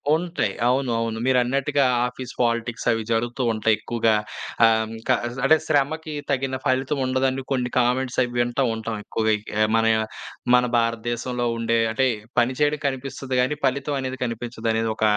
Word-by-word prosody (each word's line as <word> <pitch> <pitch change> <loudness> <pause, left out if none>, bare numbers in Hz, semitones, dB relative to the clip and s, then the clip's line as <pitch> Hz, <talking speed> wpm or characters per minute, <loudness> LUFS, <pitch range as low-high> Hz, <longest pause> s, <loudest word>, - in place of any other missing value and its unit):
ఉంటాయి. 165 - -1
అవును. 130 0 +1
అవును. 115 -1 -2
మీరన్నట్టుగా 135 +3 +2 0.2
ఆఫీస్ 125 0 -8
పాలిటిక్స్ 115 0 -1
అవి 115 -1 0
జరుగుతూ 120 +3 0
ఉంటాయి. 110 0 +2
ఎక్కువగా 115 -2 +1 0.5
ఆహ్, 110 0 +2
క - - -10 0.4
అంటే 155 +3 +6
శ్రమకి 155 +2 0 0.2
తగిన 135 0 0
ఫలితం 135 +2 +1
ఉండదని, 130 +1 0
కొన్ని 125 -2 0
కామెంట్స్ 125 +1 +1
అవి 120 - -4
వింటా 120 +3 +1
ఉంటాం. 110 0 -4
ఎక్కువగా 110 -1 +1 0.4
మన 115 - +2 0.7
మన 125 0 +4
భారతదేశంలో 120 +1 -1
ఉండే 115 0 +1
అంటే 130 +4 +2 0.3
పని 120 +2 +2
చేయడం 150 0 +1
కనిపిస్తది 130 0 -4
గానీ, 130 +4 0
పలితం 140 +2 0
అనేది 130 0 -4
కనిపించదనేది 115 -1 -2
ఒక 110 - -4
125 Hz, 140 wpm, -23 LUFS, 115-135 Hz, 0.7 s, అంటే